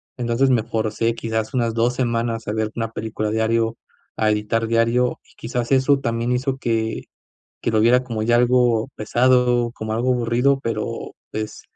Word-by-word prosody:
entonces 125 Hz, +2 st, +1 dB
me 120 Hz, -3 st, +3 dB
forcé, 110 Hz, +1 st, -1 dB
quizás 110 Hz, +3 st, -3 dB
unas 115 Hz, -2 st, +1 dB
2 120 Hz, +2 st, +1 dB
semanas 115 Hz, -2 st, -1 dB
a 105 Hz, -, -1 dB
ver 110 Hz, 0 st, -1 dB
1 115 Hz, -1 st, -3 dB
película 110 Hz, -1 st, -3 dB
diario, 115 Hz, +1 st, +1 dB, 0.4 s
a 110 Hz, -, +2 dB
editar 105 Hz, +2 st, 0 dB
diario 115 Hz, +2 st, +1 dB
y -, -, -25 dB
quizás 120 Hz, +1 st, -4 dB
eso 135 Hz, +1 st, +4 dB
también 115 Hz, -1 st, -1 dB
hizo 130 Hz, +1 st, -1 dB
que 110 Hz, -2 st, -1 dB, 0.6 s
que -, -, -1 dB
lo 110 Hz, -, +2 dB
viera 125 Hz, +3 st, +4 dB
como 115 Hz, -4 st, -3 dB
ya 120 Hz, +1 st, +3 dB
algo 120 Hz, -1 st, +3 dB
pesado, 125 Hz, +1 st, +2 dB
como 110 Hz, -1 st, -5 dB
algo 120 Hz, +3 st, 0 dB
aburrido, 125 Hz, +3 st, +2 dB
pero, 115 Hz, -, -4 dB, 0.2 s
pues, 110 Hz, 0 st, -5 dB
115 Hz, 170 wpm, -21 LUFS, 110-125 Hz, 0.6 s, eso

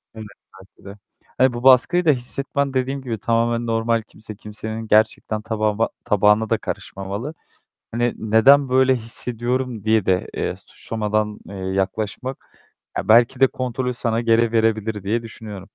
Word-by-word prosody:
Evet, 110 Hz, -, -8 dB, 0.3 s
belki 95 Hz, +1 st, -20 dB
de. 100 Hz, -, -11 dB, 0.4 s
Hani 130 Hz, -1 st, +4 dB
bu 120 Hz, -, -6 dB
baskıyı 135 Hz, +7 st, +5 dB
da 155 Hz, -, +4 dB
hissetmen 140 Hz, +2 st, -2 dB
dediğim 135 Hz, +1 st, -1 dB
gibi 115 Hz, -4 st, -4 dB
tamamen 115 Hz, +2 st, 0 dB
normal. 115 Hz, 0 st, +1 dB
Kimse, 110 Hz, -1 st, -10 dB
kimsenin 110 Hz, +2 st, -7 dB
gerçekten 110 Hz, 0 st, +2 dB
tabağıma 110 Hz, 0 st, 0 dB, 0.2 s
tabağına 105 Hz, 0 st, +3 dB
da 115 Hz, -, +2 dB
karışmamalı. 100 Hz, +12 st, -6 dB, 0.6 s
Hani, 120 Hz, +1 st, 0 dB
"Neden 125 Hz, +6 st, +5 dB
böyle 130 Hz, 0 st, +4 dB
hissediyorum?" 120 Hz, 0 st, -3 dB
diye 110 Hz, -2 st, +2 dB
de, 90 Hz, -1 st, +1 dB
eee, -, -, -2 dB
suçlamadan, 105 Hz, -1 st, -2 dB
eee, 100 Hz, -, -9 dB
yaklaşmak, 95 Hz, +6 st, -4 dB, 0.4 s
ya -, -, -3 dB
belki 120 Hz, +4 st, +5 dB
de 135 Hz, -, +7 dB
kontrolü 125 Hz, 0 st, -3 dB
sana 115 Hz, -1 st, -1 dB
geri 115 Hz, 0 st, +2 dB
verebilir 110 Hz, -2 st, 0 dB
diye 110 Hz, +5 st, -1 dB
düşünüyorum. 105 Hz, -3 st, -9 dB
115 Hz, 145 wpm, -21 LUFS, 105-125 Hz, 0.6 s, de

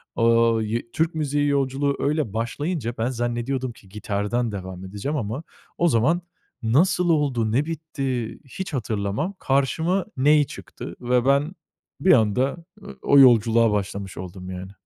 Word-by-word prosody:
Aaa, 115 Hz, -1 st, +3 dB
yı 115 Hz, +2 st, -3 dB
Türk 160 Hz, +1 st, 0 dB
müziği 145 Hz, -1 st, 0 dB
yolculuğu 140 Hz, 0 st, +1 dB
öyle 145 Hz, -7 st, 0 dB
başlayınca 120 Hz, +3 st, -2 dB
ben 115 Hz, +3 st, 0 dB
zannediyordum 120 Hz, +1 st, -2 dB
ki 105 Hz, -4 st, -18 dB
gitardan 105 Hz, +3 st, -2 dB
devam 95 Hz, -2 st, -7 dB
edeceğim 105 Hz, +11 st, -3 dB
ama 115 Hz, +6 st, -3 dB, 0.3 s
o 175 Hz, -, +3 dB
zaman 155 Hz, +7 st, +2 dB, 0.4 s
nasıl 175 Hz, +9 st, +3 dB
oldu, 135 Hz, -8 st, +1 dB
ne 135 Hz, +6 st, +2 dB
bitti, 135 Hz, -7 st, -4 dB
hiç 160 Hz, +5 st, -6 dB
hatırlamam. 110 Hz, -, -2 dB
Karşıma 160 Hz, +7 st, +1 dB
ney 150 Hz, +2 st, +5 dB
çıktı -, -, -9 dB
ve 125 Hz, 0 st, +1 dB
ben 140 Hz, +5 st, +2 dB, 0.5 s
bir 185 Hz, -, +5 dB
anda, 125 Hz, +5 st, +2 dB, 0.2 s
ııı, -, -, -11 dB
o 140 Hz, -, +5 dB
yolculuğa 115 Hz, -3 st, +6 dB
başlamış 100 Hz, -2 st, -3 dB
oldum 90 Hz, 0 st, -8 dB
yani. 95 Hz, +1 st, -7 dB
125 Hz, 140 wpm, -23 LUFS, 110-145 Hz, 0.5 s, yolculuğa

